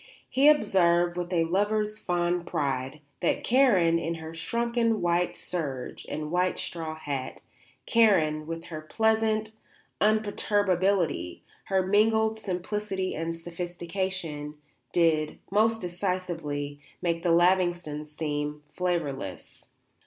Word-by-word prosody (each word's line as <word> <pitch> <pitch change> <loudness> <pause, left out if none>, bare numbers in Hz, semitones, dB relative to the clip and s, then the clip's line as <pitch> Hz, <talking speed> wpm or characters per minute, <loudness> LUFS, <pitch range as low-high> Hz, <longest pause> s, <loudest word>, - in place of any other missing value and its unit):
He 275 +3 +3
observed, 175 - +3
with 175 0 -4
a 170 -2 +3
lover's 210 +5 0
fond 175 0 0
pride, 135 0 -2 0.2
that - - +1
Karen, 195 -11 +4
in 165 0 -2
her 160 0 -8
shrunken 235 +4 0
white 175 0 +1
serge 140 -8 -4
and 150 0 -4
white 180 +1 +1
straw 160 -2 -4
hat, 140 -4 -4 0.5
Karen, 160 -9 +3
with 165 0 -5
her 155 - -4
pleasant 220 +4 +1 0.5
imperturbability, 200 - +1 0.2
her 190 -1 +1
mingled 220 +2 +3
simplicity 190 0 -3
and 165 +1 -3
sophistication, 170 -2 -4 0.4
did, 160 -3 +2
most 225 +2 +3
decisively, 175 -6 -3 0.2
make 170 -1 0
the 175 - 0
Lavingtons 175 -3 +2
seem 150 -1 -3
flavourless. 150 - -3
175 Hz, 110 wpm, -27 LUFS, 160-205 Hz, 0.5 s, Karen